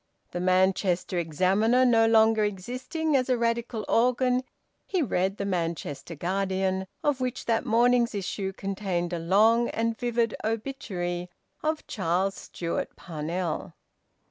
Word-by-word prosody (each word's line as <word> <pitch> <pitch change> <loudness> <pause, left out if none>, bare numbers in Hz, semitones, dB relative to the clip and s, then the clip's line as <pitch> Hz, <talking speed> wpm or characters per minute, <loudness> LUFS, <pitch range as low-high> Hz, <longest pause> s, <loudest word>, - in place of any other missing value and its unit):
The 175 - -3
"Manchester 185 0 +2
Examiner" 195 - +3
no 225 -2 +5
longer 220 -1 +5
existing 255 - -2
as 255 -1 +2
a 250 - +3
Radical 230 -2 -1
organ, 250 +2 +2 0.4
he 370 -4 +1
read 190 -5 0
the 200 - -3
"Manchester 170 -4 -3
Guardian," 190 +2 -1 0.2
of 285 -3 +1
which 255 0 -2
that 230 +3 0
morning's 240 0 +3
issue 195 0 -3
contained 190 -3 -3
a 170 - -1
long 220 +7 +4
and 230 0 -1
vivid 235 -1 0
obituary 200 -7 -3 0.3
of 310 0 -1
Charles 190 0 0
Stewart 170 -2 -4
Parnell. 165 +1 -4
205 Hz, 125 wpm, -27 LUFS, 185-235 Hz, 0.4 s, no